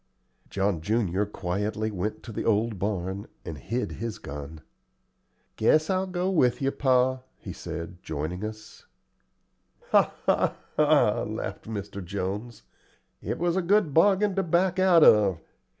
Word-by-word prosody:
John 95 Hz, -4 st, 0 dB
junior 100 Hz, 0 st, 0 dB
quietly 105 Hz, +3 st, -2 dB
went 100 Hz, +2 st, -4 dB
to 115 Hz, -, -8 dB
the -, -, -4 dB
old 110 Hz, -1 st, +1 dB
barn, 95 Hz, 0 st, -3 dB, 0.2 s
and 80 Hz, -, -5 dB
hid 120 Hz, +3 st, -3 dB
his 115 Hz, -1 st, -5 dB
gun. 75 Hz, +2 st, -8 dB, 1.0 s
"Guess 155 Hz, -, +3 dB
I'll 190 Hz, 0 st, 0 dB
go 180 Hz, 0 st, -2 dB
with 125 Hz, -9 st, +3 dB
you, 135 Hz, 0 st, 0 dB
pa," 130 Hz, -1 st, +2 dB, 0.2 s
he -, -, -8 dB
said, 85 Hz, +1 st, -7 dB
joining 80 Hz, +5 st, -4 dB
us. 110 Hz, 0 st, -8 dB, 1.0 s
"Ha, -, -, +5 dB
ha, -, -, +2 dB, 0.2 s
ha!" -, -, +4 dB
laughed -, -, -5 dB
Mr. 100 Hz, -2 st, -6 dB
Jones. 100 Hz, +5 st, -5 dB, 0.6 s
"It -, -, -3 dB
was 175 Hz, 0 st, 0 dB
a 190 Hz, -, +2 dB
good 185 Hz, -3 st, +2 dB
bargain 200 Hz, +4 st, +4 dB
to -, -, +4 dB
back 180 Hz, +2 st, +1 dB
out 180 Hz, -4 st, +6 dB
of. 100 Hz, -5 st, +5 dB
110 Hz, 140 wpm, -27 LUFS, 95-155 Hz, 1.0 s, out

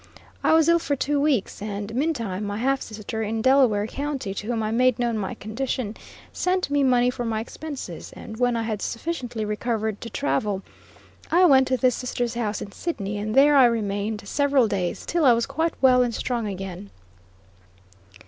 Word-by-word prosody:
I -, -, +4 dB
was 320 Hz, -1 st, +5 dB
ill 340 Hz, 0 st, +5 dB
for 290 Hz, -3 st, -1 dB
two 285 Hz, +1 st, 0 dB
weeks, 275 Hz, -9 st, 0 dB
and 205 Hz, +1 st, -5 dB
meantime, 235 Hz, -, -1 dB
my 205 Hz, 0 st, -3 dB
half 270 Hz, +4 st, +1 dB
sister 215 Hz, 0 st, -5 dB
in 220 Hz, +1 st, -2 dB
Delaware 255 Hz, -6 st, +4 dB
County, 275 Hz, -4 st, -4 dB
to 205 Hz, +2 st, -6 dB
whom 230 Hz, -2 st, -1 dB
I 215 Hz, -, -1 dB
made 250 Hz, +1 st, +3 dB
known 240 Hz, -2 st, 0 dB
my 200 Hz, -3 st, -3 dB
condition, 225 Hz, 0 st, -3 dB, 0.4 s
sent 365 Hz, -4 st, 0 dB
me 285 Hz, 0 st, +2 dB
money 250 Hz, -2 st, +3 dB
for 245 Hz, -1 st, -5 dB
my 225 Hz, -2 st, -1 dB
expenses, 250 Hz, -, -7 dB
and 220 Hz, -, -9 dB
when 245 Hz, 0 st, +2 dB
I 230 Hz, -, -1 dB
had 215 Hz, -3 st, -3 dB
sufficiently 240 Hz, -5 st, -3 dB
recovered 215 Hz, 0 st, -2 dB
to 230 Hz, -, -6 dB
travel, 190 Hz, +5 st, -1 dB, 0.7 s
I 355 Hz, +3 st, +5 dB
went 265 Hz, -5 st, +6 dB
to 260 Hz, -, +1 dB
this 255 Hz, -1 st, +3 dB
sister's 245 Hz, -1 st, -2 dB
house 220 Hz, -3 st, -2 dB
in 200 Hz, -, -10 dB
Sidney, 205 Hz, -, -4 dB
and 215 Hz, +1 st, -3 dB
there 290 Hz, +2 st, +6 dB
I 265 Hz, -2 st, +8 dB
remained 210 Hz, -2 st, -1 dB
several 280 Hz, -3 st, +3 dB
days, 185 Hz, -4 st, -2 dB
till 340 Hz, -1 st, 0 dB
I 255 Hz, -4 st, +7 dB
was 235 Hz, 0 st, +1 dB
quite 325 Hz, +1 st, -1 dB
well 255 Hz, -1 st, +6 dB
and 240 Hz, -2 st, 0 dB
strong 235 Hz, -3 st, -2 dB
again. 195 Hz, 0 st, -6 dB
235 Hz, 185 wpm, -24 LUFS, 210-270 Hz, 0.7 s, I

